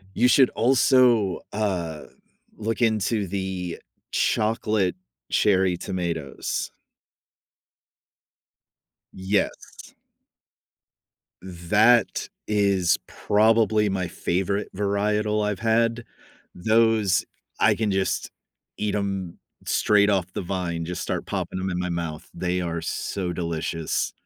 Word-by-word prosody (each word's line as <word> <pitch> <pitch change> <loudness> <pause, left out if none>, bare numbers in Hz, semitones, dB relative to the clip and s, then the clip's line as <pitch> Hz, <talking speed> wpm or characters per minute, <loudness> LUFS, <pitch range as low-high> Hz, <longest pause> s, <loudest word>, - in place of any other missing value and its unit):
You 125 - +4
should 130 0 +5
also, 120 -5 +3
uh, 90 -7 -2 0.5
look 110 +2 -3
into 110 -2 +1
the 95 -2 -4 0.3
chocolate 105 -3 +1 0.4
cherry 95 -3 +3
tomatoes. 85 -6 -3 2.4
Yes. 95 +2 -3 1.5
That 100 +7 +2 0.2
is 100 -4 +2
probably 110 0 +2
my 95 -2 -1
favorite 95 +5 -2
varietal 105 +1 0
I’ve 105 -2 -2
had. 115 +1 +1 0.5
Those, 110 -1 +2 0.3
I - - +5
can 110 -2 -1
just 95 0 -1 0.5
eat 105 -1 -1
’em 95 -4 -3 0.3
straight 105 0 +3
off 95 -2 0
the - - -3
vine. 85 -2 -3
Just 90 +1 -4
start - - -3
popping - - -3
'em 95 +1 -2
in 90 - -2
my 90 0 -2
mouth. 85 -3 -4
They 90 0 -1
are 85 -1 -3
so 90 +2 -3
delicious. 80 -1 -2
100 Hz, 100 wpm, -24 LUFS, 90-110 Hz, 2.4 s, should